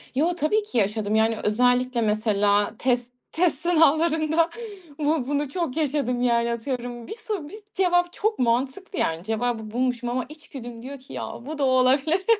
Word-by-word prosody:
Yo, 320 +6 +2
tabii 355 +7 +1
ki 335 -12 -4
yaşadım. 210 0 +1
Yani, 220 0 +3
özellikle 245 +3 +2
mesela 210 -1 +2
test 245 -1 0 0.2
test 335 -1 +1
sınavlarında 325 0 +3 0.5
bu 295 -3 +1
bunu 290 0 -1
çok 320 -2 -3
yaşadım, 275 -5 0
yani, 235 -1 +2
atıyorum. 240 0 -5
Bir - - -6
soru 425 -9 -5
bist 420 +3 -12
cevap 355 -2 +2
çok 430 +1 -1
mantıklı, 260 +11 0
yani, 165 +1 0
cevabı 220 0 -2
bulmuşum 245 0 -1
ama 250 +1 -1
içgüdüm 250 -6 -9
diyor 275 +3 -8
ki 260 - -13
ya, - - -5
bu 310 +2 -5
da 285 - -1
olabilir. 270 +7 +3
260 Hz, 160 wpm, -24 LUFS, 235-320 Hz, 0.5 s, Yani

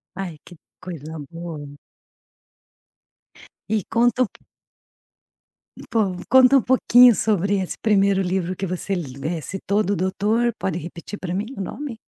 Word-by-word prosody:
Ai 185 -4 -5
que 175 - -13 0.2
coisa 160 -3 -8 0.2
boa. 155 -4 -8 1.9
E 220 +1 +1
conta 240 +2 +2
um 245 - -1
po - - -22 1.5
po, 205 -5 +1
conta 260 +1 +7
um - - +3
pouquinho 250 -1 +6
sobre 200 -2 +1
esse 185 - -4
primeiro 200 -2 +3
livro 185 -1 -1
que 195 - -3
você 185 +2 -3
lê 155 +1 -4
citou 195 +7 -1
do 200 +1 0
doutor, 210 +6 +1
pode 175 -3 -2
repetir 170 +4 -8
pra 175 -1 -4
mim 200 +3 -1
o - - -3
nome? 260 +4 -6
195 Hz, 140 wpm, -22 LUFS, 175-220 Hz, 1.9 s, conta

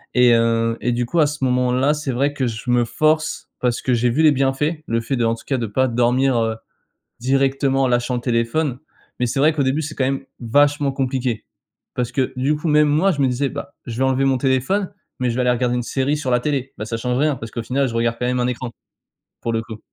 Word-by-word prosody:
Et 125 -1 +6
heu, 115 0 +2
et 120 - 0
du 120 0 0
coup, 170 +7 -1
à 150 - +5
ce 150 -2 -5
moment-là, 125 +3 +2
c'est 150 -3 -3
vrai 140 +4 0
que 130 -3 -1
je 115 +2 -3
me 120 0 +3
force 155 +5 0
parce 125 -1 0
que 130 - 0
j'ai 120 +1 +2
vu 145 +7 +1
les 155 - +7
bienfaits, 145 +4 0
le 115 0 0
fait 125 +4 -2
d'en 115 -1 +1
tout - - -14
cas 135 - 0
de 115 - -2
pas 130 +5 +1
dormir, 125 +2 +2
heu, 110 0 0 0.6
directement 135 +1 +1
en 130 - +3
lâchant 120 +1 0
le 120 - -3
téléphone. 120 +3 0 0.4
Mais 125 - +1
c'est 120 - -2
vrai 155 +3 +4
qu'au 150 - -1
début, 135 +4 +1
c'est 155 +1 -5
quand 135 - 0
même 135 0 -2
vachement 145 +4 +2
compliqué, 130 -3 -2 0.5
parce 125 -1 -2
que 130 0 -1
du 140 +4 +1
coup, 150 +3 -4
même 150 -1 +4
moi, 160 +7 +3
je 145 - -2
me 135 - +4
disais: 130 +2 0
«Bah, 140 0 -7
je 115 -2 -6
vais - - +2
enlever 135 0 +2
mon 135 -1 +2
téléphone 135 +11 0 0.3
mais 125 -1 0
je 115 - -2
vais 130 - +1
aller 125 0 +3
regarder 125 0 0
une 120 - -1
série 135 +4 0
sur 130 -4 -2
la 125 - +3
télé». 135 0 -2
Bah, 110 - -3
ça 115 +1 -3
change 125 +2 -1
rien 150 0 +2
parce 115 -3 -8
qu'au 115 - -4
final 135 +3 0
je 115 - -5
regarde 115 0 0
quand 125 - -1
même 125 0 0
un 125 - +1
écran 125 0 -4 0.7
pour 115 - -1
le 115 - 0
coup. 110 -1 -9
130 Hz, 255 wpm, -20 LUFS, 120-140 Hz, 0.7 s, les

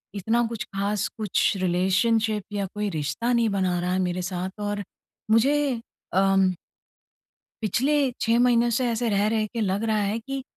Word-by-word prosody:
इतना 225 +5 +1
कुछ 225 -2 -4
ख़ास 200 +1 0
कुछ 215 -4 +1
रिलेशनशिप 200 +4 +1
या 200 -1 -1
कोई 210 0 -1
रिश्ता 155 - -2
नहीं 235 -2 +3
बना 185 -3 0
रहा 180 +1 -1
है 185 - +1
मेरे 180 0 -1
साथ। 185 +2 -4
और 205 0 -2 0.5
मुझे 240 +6 +4 0.6
अम 195 0 +4 1.1
पिछले 270 +6 +1
6 230 +1 +3
महीने 240 -1 +4
से 245 +2 +1
ऐसे 230 0 0
रह-रह 215 +2 +1
के 230 - -2
लग 200 +1 0
रहा 220 -1 +1
है 205 +1 0
कि 270 +3 -5
210 Hz, 160 wpm, -25 LUFS, 190-230 Hz, 1.1 s, मुझे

